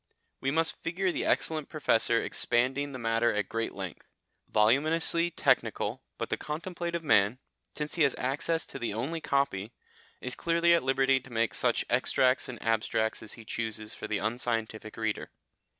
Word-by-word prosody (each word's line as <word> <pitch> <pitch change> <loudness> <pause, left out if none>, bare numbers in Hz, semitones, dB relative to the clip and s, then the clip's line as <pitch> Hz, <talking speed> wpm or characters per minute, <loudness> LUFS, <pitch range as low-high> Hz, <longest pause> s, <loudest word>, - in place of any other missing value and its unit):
We 135 - 0
must 160 +3 +1
figure 185 +2 0
the - - -2
excellent 155 -3 +1
Professor 115 -6 +2
expanding 130 +6 0
the 130 - -6
matter 115 0 +2
at 105 -2 0
great 115 0 -3
length, 95 -3 -7 0.4
voluminously 155 +9 +3
technical, - - +1 0.2
but - - -4
the - - +1
contemplative 170 +2 -4
man 105 -5 +4 0.4
since 150 0 -3
he 170 - -1
has 140 -3 +4
access 150 +5 0
to - - -8
the 115 -3 -2
only 150 +9 -2
copy 120 -8 0 0.5
is 125 - -5
clearly 170 0 +3
at 170 - +4
liberty 135 0 +3
to 135 - -15
make 115 -1 0
such - - +1
extracts 130 0 +2
and 120 - -7
abstracts 110 0 +1
as 110 - -4
he 115 - -10
chooses 110 -1 -4
for - - -6
the 105 - 0
unscientific 110 -1 -2
reader. 110 -1 -2
130 Hz, 165 wpm, -29 LUFS, 110-155 Hz, 0.5 s, man